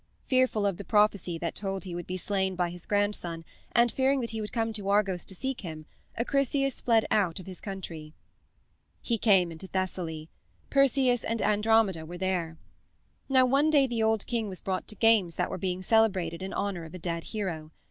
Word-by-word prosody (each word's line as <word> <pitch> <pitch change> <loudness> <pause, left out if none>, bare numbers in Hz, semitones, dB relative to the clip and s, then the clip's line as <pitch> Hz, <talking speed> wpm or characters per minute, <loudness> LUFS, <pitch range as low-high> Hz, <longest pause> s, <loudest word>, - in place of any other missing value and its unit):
Fearful 255 -5 +2
of 195 -3 0
the 200 - -6
prophecy 200 -5 +2
that 170 0 -3
told 195 -1 -3
he 185 -3 -6
would 175 0 -5
be 185 - -3
slain 190 0 -1
by 175 -1 0
his 175 0 -11
grandson 205 -5 -1 0.3
and 240 -1 +4
fearing 270 +1 +2
that 230 - -3
he 220 -1 -3
would 210 - -4
come 225 -1 -1
to 205 -2 -3
Argos 195 -3 +1
to 190 - -7
seek 265 +4 -3
him, 155 -5 -7 0.3
Acrisius 275 +2 0
fled 230 -2 +3
out 195 -6 +2
of 185 - -10
his 185 -2 -9
country. 165 -6 -7 0.8
He 230 -2 -1
came 190 -6 +4
into 165 +4 -8
Thessaly. 175 -4 -3 0.4
Perseus 265 -3 +3
and 230 0 -2
Andromeda 210 -4 +2
were 175 +3 -8
there. 175 -3 -2 0.7
Now, 260 -1 +5
one 275 +4 +3
day 290 -3 +5
the 240 -3 -2
old 220 -1 +2
king 230 -3 -2
was 185 -2 -7
brought 185 -1 -3
to 215 - -6
games 215 -6 +3
that 180 - -1
were 185 - -4
being 185 0 -2
celebrated 185 -6 +2
in 190 +1 -4
honor 195 -4 -2
of 165 +2 -10
a - - -5
dead 170 -1 -4
hero. 175 -8 -4
195 Hz, 200 wpm, -28 LUFS, 175-225 Hz, 0.8 s, Now